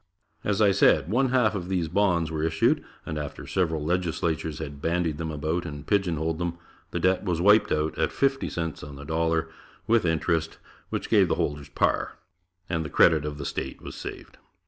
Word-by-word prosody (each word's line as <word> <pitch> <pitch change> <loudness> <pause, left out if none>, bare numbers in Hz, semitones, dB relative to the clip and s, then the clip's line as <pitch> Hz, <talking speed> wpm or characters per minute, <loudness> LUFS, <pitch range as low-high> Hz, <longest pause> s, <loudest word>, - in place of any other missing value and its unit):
As 105 +1 +2
I 100 - +6
said, 95 -2 +4
one 130 +3 +3
half 125 -4 +3
of 90 -3 -4
these 90 -4 0
bonds 85 -2 +1
were 80 -1 -2
issued 80 0 +2 0.2
and 75 - -3
after 75 -2 -6
several 80 -5 0
legislatures 80 -3 -1
had 70 -3 -7
bandied 85 -2 0
them 80 -1 -3
about 80 +3 -2
and 75 -3 -7
pigeonholed 80 -5 0
them, 85 -1 -2 0.3
the - - -3
debt 95 0 +2
was 90 -4 -1
wiped 105 +3 +5
out 75 +1 0
at - - +1
fifty 135 0 +1
cents 80 -2 -4
on 70 -1 -8
the 70 0 -9
dollar 80 +1 0 0.4
with 115 -1 +3
interest, 80 -1 0 0.3
which - - -3
gave - - +4
the - - +1
holders 75 0 -2
par, 75 - 0 0.5
and 80 -1 -1
the 75 - -5
credit 80 +1 +4
of 75 -1 -4
the 70 - -5
state 65 0 -4
was - - -7
saved. - - -9
80 Hz, 190 wpm, -26 LUFS, 75-90 Hz, 0.5 s, I